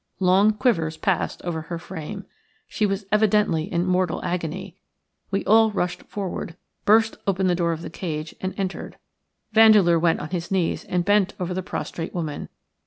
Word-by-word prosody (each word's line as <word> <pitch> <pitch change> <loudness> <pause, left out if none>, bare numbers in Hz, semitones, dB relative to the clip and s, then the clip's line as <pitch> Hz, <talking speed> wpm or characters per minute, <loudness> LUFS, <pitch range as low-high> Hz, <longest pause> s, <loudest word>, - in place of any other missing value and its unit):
Long 195 +3 +4
quivers 165 -9 0
passed 190 -1 -1
over 170 -2 -3
her 170 +2 -5
frame. 185 +3 -7 0.4
She 210 - 0
was 195 0 -2
evidently 210 -6 +2
in 175 -1 0
mortal 185 -2 +1
agony. 180 +1 -4 0.5
We 195 0 -1
all 220 +1 +5
rushed 180 -4 -2
forward, 185 -4 -5 0.3
burst 220 +1 +4
open 190 -1 +1
the 180 - +3
door 170 -1 +1
of 165 0 -4
the - - -7
cage, 155 -3 -5
and 185 0 -3
entered. 190 -1 -4 0.5
Vandeleur 210 -6 +6
went 165 0 +2
on 155 - -7
his 175 -2 -3
knees 185 -4 0
and 180 -1 -1
bent 205 -1 +2
over 180 0 -2
the 185 - -2
prostrate 170 -2 -5
woman. 155 -4 -4
185 Hz, 170 wpm, -24 LUFS, 170-200 Hz, 0.5 s, Vandeleur